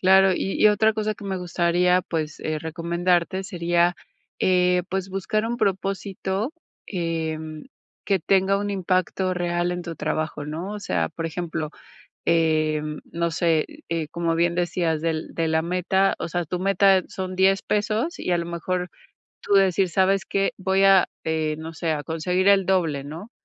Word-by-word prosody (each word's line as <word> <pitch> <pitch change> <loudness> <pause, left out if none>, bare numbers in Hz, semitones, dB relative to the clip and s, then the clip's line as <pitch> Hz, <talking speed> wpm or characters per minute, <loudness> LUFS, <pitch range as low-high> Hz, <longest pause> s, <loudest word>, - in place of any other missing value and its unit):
Claro. 190 0 +6
Y 195 - -2
y - - +8
otra 220 +1 +3
cosa 215 0 -1
que 205 - -12
me 190 -1 -2
gustaría, 180 0 +2
pues, 155 -3 -4
eh, 155 0 -2
recomendarte, 170 +3 0
sería, 175 0 +1 0.5
eh, 180 -1 +3
pues, 190 +1 -2
buscar 205 +3 -1
un 240 +1 -2
propósito, 195 - -2 0.3
em, 160 -3 -3 0.4
que 195 -2 +2
tenga 195 +3 +2
un 205 0 -2
impacto 185 0 0
real 175 0 0
en 175 0 -3
tu 170 -1 -6
trabajo, 155 -2 -3
¿no? 165 +7 -5
O 210 - -6
sea, 85 - -1
por 165 - -6
ejemplo, 160 -2 -4 0.6
eh, 155 -2 +2 0.3
no 170 0 0
sé, 165 -2 +2 0.2
eh, 165 -2 -1
como 165 0 -1
bien 170 0 +2
decías, 175 -2 0
del 160 -1 -2
de 165 -1 0
la 160 0 +2
meta. 185 +3 +1
O - - -3
sea, 175 0 -1
tu 180 +3 -4
meta 195 -1 +4
son 185 -1 -5
$10 190 +1 +3
pesos, 215 +9 -1
y - - -3
a 175 - +3
lo 170 - -3
mejor, 180 +1 -3 0.5
tú 205 - -1
decir: 195 -1 +4
"¿Sabes 190 +2 +2
qué? 195 0 0
Voy 190 +1 +1
a 195 -2 +6 0.2
eh, 155 -1 -1
no 160 +1 -7
sé, 160 +1 -2
a 145 -1 -3
conseguir 180 +4 +1
el 195 -2 +5
doble", 165 -7 +1
¿no? 170 +11 -8
180 Hz, 170 wpm, -24 LUFS, 165-190 Hz, 0.6 s, y